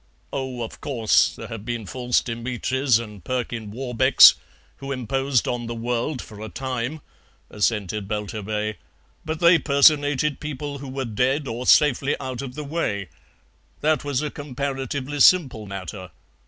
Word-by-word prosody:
"Oh, 130 -3 -3
of 110 - -9
course, 115 -7 +2
there - - -8
have 115 -3 -7
been 120 -1 -4
False 125 +4 0
Dimitris 125 +2 0
and 105 -5 -8
Perkin 115 -3 -3
Warbecks, 130 +3 +6 0.4
who 140 0 -7
imposed 135 0 0
on 120 -1 -2
the 120 - -4
world 120 +4 -2
for 105 -2 -12
a 110 - -6
time," 130 +5 -4 0.5
assented 105 -1 -1
Belturbet, 105 0 -3 0.5
"but 160 0 -4
they 170 -1 +6
personated 145 0 +3
people 145 -1 -5
who 135 0 -8
were 135 0 -3
dead 130 +6 0
or 120 +2 -4
safely 145 -1 +4
out 130 -1 -5
of 130 -2 -7
the 150 - -5
way. 125 - -2 0.7
That 155 0 +2
was 145 0 -1
a 150 - -3
comparatively 140 0 -4
simple 130 - +4
matter. 95 -1 -7
125 Hz, 145 wpm, -23 LUFS, 115-140 Hz, 0.7 s, Warbecks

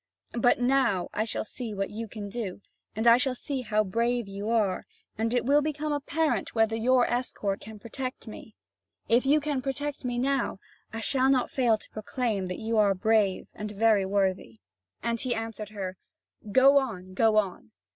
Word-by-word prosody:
But 240 +1 +3
now 245 -7 +2
I 215 - 0
shall 225 - -2
see 225 -1 -6
what 195 0 -2
you 225 +2 -5
can 210 -1 -7
do, 200 -2 -5 0.3
and 220 +2 -2
I 235 0 +8
shall 255 0 0
see 270 +1 -4
how 215 -3 +1
brave 235 +3 0
you 200 +2 -5
are, 215 -5 +1 0.3
and 225 +1 -1
it 245 -1 +1
will 285 +3 +4
become 300 0 -2
apparent 295 +1 -1
whether 225 0 +3
your 245 +2 +3
escort 220 -5 -2
can 220 +1 -10
protect 255 +4 -6
me. 215 0 -10 0.5
If 245 +3 +3
you 295 +2 +5
can 290 -3 -2
protect 285 +2 -4
me 245 -1 -2
now, 270 -2 0 0.3
I 225 - -5
shall 260 +3 +3
not 260 -2 +2
fail 240 -4 +3
to - - -12
proclaim 215 -2 -2
that 180 - -4
you 225 0 0
are 200 -2 +4
brave 210 -1 +2
and 210 0 -5
very 210 -1 +3
worthy." 190 - 0 0.5
And 235 0 -1
he 255 -2 -1
answered 225 -2 -5
her: 190 -3 -5 0.5
"Go 270 +5 +7
on, 185 -8 -5
go 220 +2 +3
on!" 190 - -1
225 Hz, 185 wpm, -28 LUFS, 210-255 Hz, 0.5 s, I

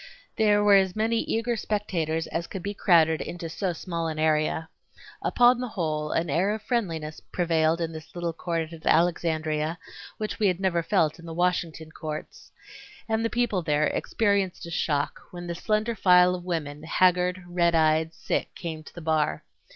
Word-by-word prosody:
There 210 -2 +3
were 205 -1 +6
as 190 -1 +1
many 225 +1 +1
eager 230 +2 -1
spectators 170 -7 -1
as 170 0 -4
could 190 - -7
be 205 - -3
crowded 165 -5 +4
into 170 -1 -5
so 185 +3 -2
small 170 -1 -4
an 160 -1 -4
area. 155 +1 +1 0.5
Upon 245 0 +4
the 250 - -2
whole 155 -8 -2
an 165 - 0
air 185 +8 +1
of 220 - -9
friendliness 165 -11 -2
prevailed 165 -2 +2
in 165 -1 -2
this 155 0 -10
little 170 -1 -2
court 165 -1 -3
at 165 -1 -11
Alexandria 160 -1 +1 0.4
which 215 -1 -4
we 210 - +3
had 180 -2 0
never 185 -3 +1
felt 165 -3 +1
in 170 - -11
the 165 - -6
Washington 170 -3 -1
courts. 155 -1 -7 0.6
And 220 0 0
the 230 - +1
people 240 -6 0
there 150 -2 +1
experienced 200 -3 0
a 170 - -8
shock 145 -3 -1
when 175 0 -8
the 170 - -3
slender 215 +5 0
file 180 -3 +5
of 180 -1 -5
women, 150 -5 -3
haggard, 180 +2 +2
red 170 -1 +2
eyed, 160 0 +3
sick, 160 - -3
came 160 -3 -5
to - - -14
the 170 - -8
bar. 155 - 0
170 Hz, 180 wpm, -26 LUFS, 160-195 Hz, 0.6 s, were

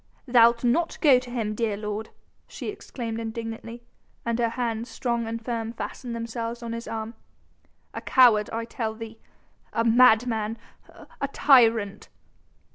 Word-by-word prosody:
"Thou'lt 235 -1 +5
not 320 +8 +1
go 275 -6 +6
to 250 0 -11
him, 225 -3 -2
dear 215 -2 -1
lord," 210 +1 -4 0.4
she - - -6
exclaimed 235 - -6
indignantly, 230 +1 -6 0.4
and 235 0 -1
her 235 -1 +2
hands, 230 -1 -3
strong 235 -1 -2
and 230 0 -3
firm, 230 -2 -3
fastened 240 0 -6
themselves 230 +1 -5
on 230 0 -4
his 230 0 -6
arm. 220 0 -5 0.8
"A - - -5
coward, 230 -5 +5
I 230 0 -3
tell 225 -1 -4
thee... 225 0 -9 0.5
a 230 - +1
madman... 225 -2 +4 0.3
a 280 - -7
tyrant 230 -8 +3
230 Hz, 140 wpm, -25 LUFS, 225-240 Hz, 0.8 s, go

